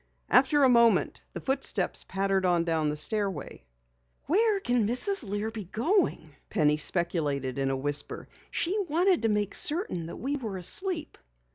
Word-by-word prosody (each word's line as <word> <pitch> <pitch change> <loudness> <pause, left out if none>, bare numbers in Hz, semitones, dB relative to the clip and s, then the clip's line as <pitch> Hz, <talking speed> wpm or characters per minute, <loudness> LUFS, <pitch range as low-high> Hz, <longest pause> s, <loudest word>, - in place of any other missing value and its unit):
After 275 +3 +4
a - - +7
moment 235 -2 +3
the - - -5
footsteps 265 -8 -1
pattered 195 0 -1
on 175 -2 +2
down 160 -2 0
the 150 - -3
stairway. 195 - -2 0.6
"Where 415 - +2
can 245 - 0
Mrs. 285 - +2
Lear 205 +1 -3
be 220 -3 -7
going?" 225 - -1
Penny 150 -6 +2
speculated 145 -6 -1
in 135 0 0
a 135 - -1
whisper. 145 +2 0 0.2
"She 355 +4 -1
wanted 350 +4 +2
to 225 - +1
make 210 -1 -1
certain 290 - -1
that - - -8
we 280 +3 -3
were 220 -8 -5
asleep." 325 - -2
210 Hz, 155 wpm, -28 LUFS, -, 0.6 s, a